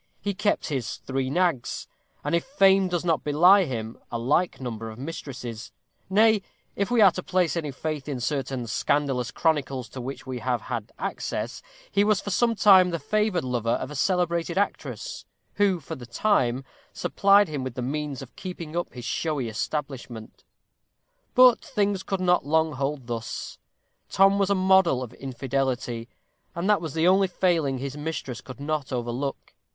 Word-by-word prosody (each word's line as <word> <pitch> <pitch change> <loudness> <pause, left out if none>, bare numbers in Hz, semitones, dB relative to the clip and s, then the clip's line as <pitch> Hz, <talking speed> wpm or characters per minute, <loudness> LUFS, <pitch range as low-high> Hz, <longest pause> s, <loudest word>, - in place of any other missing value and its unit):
He 205 - -2
kept 210 +1 0
his 130 -6 -2
three 130 0 -3
nags; 170 -5 0 0.4
and, - - -2
if 170 - +2
fame 195 -8 +4
does 175 -1 -2
not 165 -3 +1
belie 180 +7 +6
him, 115 -5 -5
a 120 - -2
like 145 +10 +1
number 115 -3 -5
of 110 - -10
mistresses; 125 -5 -7 0.4
nay, 215 +1 +4 0.3
if 200 - -1
we 240 -2 +3
are 195 -3 +8
to 185 - -5
place 180 -2 +1
any 160 -3 -2
faith 150 +1 -4
in 135 -3 -3
certain 130 -1 -2
scandalous 135 +2 0
chronicles 135 -7 0
to 130 - -7
which 135 +4 -6
we 130 -2 -4
have 120 -1 -1
had 115 -4 -5
access, - - -4 0.3
he 200 - +3
was 210 -2 +3
for 200 - -5
some 230 +4 +2
time 190 -3 +7
the 170 - -1
favored 210 -1 0
lover 120 -2 0
of 130 - -6
a - - -7
celebrated 170 +2 0
actress, 200 - -2 0.3
who, 200 -3 +3
for 160 +1 -8
the 125 -6 -8
time, 130 - +1 0.3
supplied 200 0 +4
him 145 -4 -4
with 130 -2 -5
the 125 - -3
means 145 0 -3
of 130 - -14
keeping 170 -4 -7
up 175 - -2
his 125 -2 -7
showy 150 -5 -1
establishment. 120 -1 -5 0.9
But 255 -2 +7
things 200 -2 0
could 195 -1 -3
not 180 -1 +3
long 160 +2 +2
hold 135 -1 -3
thus. 115 -1 -5 0.5
Tom 195 +1 +4
was 195 -1 +2
a 200 - +3
model 185 -8 +4
of 125 -1 -9
infidelity, 130 -3 -3 0.5
and 170 +3 -2
that 210 -5 +4
was 160 -4 -5
the 165 +2 +3
only 190 +1 +5
failing 170 -7 +1
his 135 +2 -5
mistress 150 -5 -5
could 130 0 -11
not 145 -1 -2
overlook. 125 +2 -3
150 Hz, 175 wpm, -26 LUFS, 130-185 Hz, 0.9 s, are